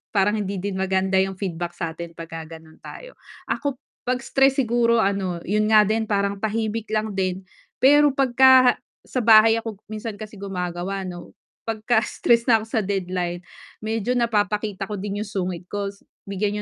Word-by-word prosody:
Parang 205 +2 +3
hindi 200 -2 -3
din 195 0 -3
maganda 190 0 +1
'yung 190 0 +1
feedback 175 -3 -4
sa'tin 170 0 -6
'pagka 165 -1 -8
gano'n 160 0 -18
tayo. - - -11 0.3
Ako 280 -3 -2 0.3
'pag 250 +1 -1
stress 270 +1 +3
siguro 235 -1 +2
ano, 195 -4 -1
'yun 210 +3 +1
nga 215 - +8
din 220 +1 0
parang 200 -1 0
tahimik 220 +1 -2
lang 215 -1 -1
din, 185 0 -1 0.4
pero 290 +1 +6
pagka 260 -1 +5 0.3
sa 255 - -3
bahay 225 0 +7
ako, 225 -3 -5
minsan 215 0 -5
kasi 215 0 -9
gumagawa 190 0 -4
'no, 175 -1 -8 0.3
'pagka 220 +1 +1
stress 235 -1 +2
na 230 -3 +5
ako - - -8
sa 225 - 0
deadline 180 -3 -2 0.4
medyo 220 +1 -2
napapakita 210 -4 0
ko 210 - -3
din 205 +1 -3
'yung 215 - -10
sungit 185 -3 -3
ko, 205 -1 -3 0.4
bigyan 205 +1 -2
205 Hz, 160 wpm, -23 LUFS, 190-225 Hz, 0.4 s, nga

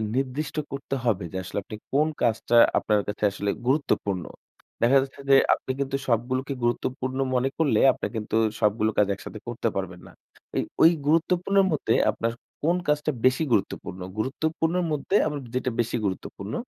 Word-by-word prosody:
নির্দিষ্ট 135 +4 -2 0.2
করতে 135 0 -4
হবে, 105 -5 +1
যে - - -3
আসলে 95 - -6
আপনি 110 - -8 0.2
কোন 150 +3 +3
কাজটা 120 0 +1 0.2
আপনার 105 -1 +2
কাছে 105 +1 -5
আসলে 100 0 -3 0.2
গুরুত্বপূর্ণ? 100 - 0 0.6
দেখা 135 +4 +6
যাচ্ছে 135 +1 -7
যে, 135 - +8 0.2
আপনি 130 - -3
কিন্তু 135 0 -1
সবগুলোকে 130 +4 0
গুরুত্বপূর্ণ 130 +2 -1 0.2
মনে 130 +2 +2
করলে 140 -9 +2
আপনি - - -5
কিন্তু 110 0 -3 0.2
সবগুলো 105 +1 +2
কাজ 105 - +4
একসাথে 110 - -9
করতে 120 -1 -2
পারবেন 95 -2 -4
না। - - -14 0.5
এই - - +2 0.2
ওই 165 - +9 0.2
গুরুত্বপূর্ণর 180 +5 +3
মধ্যে 135 -7 +1 0.2
আপনার 115 +2 -2 0.3
কোন 170 +3 +3
কাজটা 150 +1 +1
বেশি 130 +5 +4
গুরুত্বপূর্ণ? 95 -3 -1 0.2
গুরুত্বপূর্ণের 160 +8 -1
মধ্যে 150 +7 -1
আবার 145 -1 -3
যেইটা 130 0 -1
বেশি 115 +1 -3
গুরুত্বপূর্ণ 100 +2 -4
130 Hz, 160 wpm, -25 LUFS, 110-150 Hz, 0.6 s, ওই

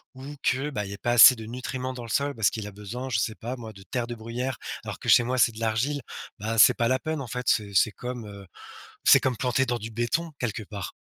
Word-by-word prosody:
ou 140 +3 -9
que, 135 +3 +1
bah, 105 -7 -3
il 100 - -8
y - - -5
a - - -13
pas 120 - -1
assez 120 +2 +10
de 110 - -8
nutriments 130 +2 -5
dans 125 - -8
le 115 - -9
sol 140 +4 0
parce 110 -2 +3
qu'il 110 -2 -6
a - - -8
besoin, 105 +6 -7
je 110 -5 +1
sais 110 +2 -1
pas 120 +3 -5
moi, 115 -3 -9
de 95 - -14
terre 120 +3 -3
de 120 - -5
bruyère 120 +3 -4 0.3
alors - - -6
que - - -9
chez 120 - +7
moi, 130 +2 -2
c'est 115 -1 +4
de 110 - -10
l'argile, 120 +6 0 0.4
bah, 110 +3 -3
c'est - - +8
pas 115 -1 +1
la 130 0 +2
peine, 155 -2 -3
en 130 - -6
fait. 125 +1 -5
C'est 105 -2 +2
c'est 105 +3 +4
comme, 125 -2 -7
heu, 100 -1 -10 0.6
c'est - - +7
comme 130 -3 -1
planter 130 +1 +1
dans 120 - 0
du 110 +1 -7
béton 120 +9 -1
quelque 120 -2 -3
part. 100 -2 -7
120 Hz, 275 wpm, -26 LUFS, 110-130 Hz, 0.6 s, assez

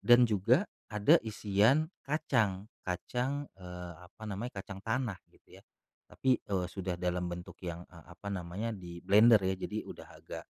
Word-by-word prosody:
Dan 120 0 +7
juga, 115 - +3 0.3
ada 105 0 +6
isian 110 +8 +3 0.2
kacang, 115 -10 +1 0.2
kacang, 125 +10 -2 0.2
eee, 90 -1 -7
apa 90 +5 -13
namanya, 105 +2 -5
kacang 100 -1 -8
tanah, 110 -2 -1
gitu, - - -18
ya, - - -26 0.5
tapi, 130 -1 +2
eee, 95 -3 -1
sudah 95 -1 -3
dalam 90 0 0
bentuk 85 0 -7
yang, 85 0 -5
eee, 85 -3 -15
apa 100 +3 -8
namanya 95 +5 -3
di 90 -4 -8
blender, 110 +2 +7
ya. 95 0 +2
Jadi, 105 +3 -4
udah - - -9
agak, - - -9
100 Hz, 160 wpm, -32 LUFS, 90-115 Hz, 0.5 s, Dan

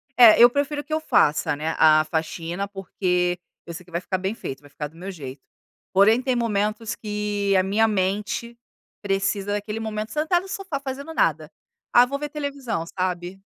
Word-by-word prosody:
É, 235 -3 +8
eu 240 - +11
prefiro 290 +2 -1
que 310 - -6
eu 315 - +2
faça, 150 - +2
né, 155 +2 -2
a 155 0 +6
faxina, 165 +4 -3
porque 180 -2 -1 0.3
eu 170 - -7
sei 175 +2 -8
que 175 - -19
vai 170 +1 -2
ficar 185 0 -2
bem 190 +4 -2
feito, 135 -11 -6
vai 145 - -17
ficar 150 +1 -5
do 160 - -21
meu 185 +3 -7
jeito. 140 -7 -8 0.5
Porém 215 +6 +5
tem 260 -1 0
momentos 215 -1 -1
que 205 -2 -1
a 185 - +4
minha 210 +4 +2
mente 210 +4 -1 0.5
precisa 195 0 -1
daquele 210 +1 -3
momento 215 -1 -4
sentado 320 +4 +1
no 385 - -11
sofá 380 -9 -4
fazendo 280 +3 -6
nada. 155 - +1 0.4
"Ah, 245 +1 +8
vou 280 +2 -4
ver 295 0 -4
televisão", 280 - -3 0.2
sabe? 180 +1 -3
205 Hz, 185 wpm, -24 LUFS, 180-240 Hz, 0.5 s, eu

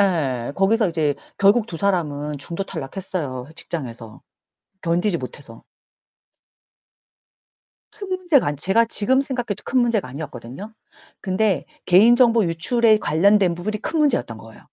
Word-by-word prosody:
예 140 -11 0
거기서 210 +2 +2
이제 155 -4 0 0.2
결국 205 +3 +4
2 170 - -7
사람은 150 -6 -1
중도 170 +7 -5
탈락했어요 145 -5 -5
직장에서. 120 -10 -7 0.6
견디지 170 +1 +1
못해서. 125 -2 -10 2.3
큰 400 - -8
문제가 355 - +2
아니 145 0 -2
제가 195 +10 +2
지금 255 +4 +2
생각해도 245 -7 -4
큰 260 - +1
문제가 230 - +1
아니었거든요. 140 - -8 0.5
근데 190 -4 0 0.2
개인 215 +7 +6
정보 235 -3 +4
유출에 215 +7 +2
관련된 185 +2 +3
부분이 210 +4 -4
큰 320 -1 -2
문제였던 245 - +1
거예요. 115 0 -14
185 Hz, 305 characters per minute, -21 LUFS, 145-220 Hz, 2.3 s, 개인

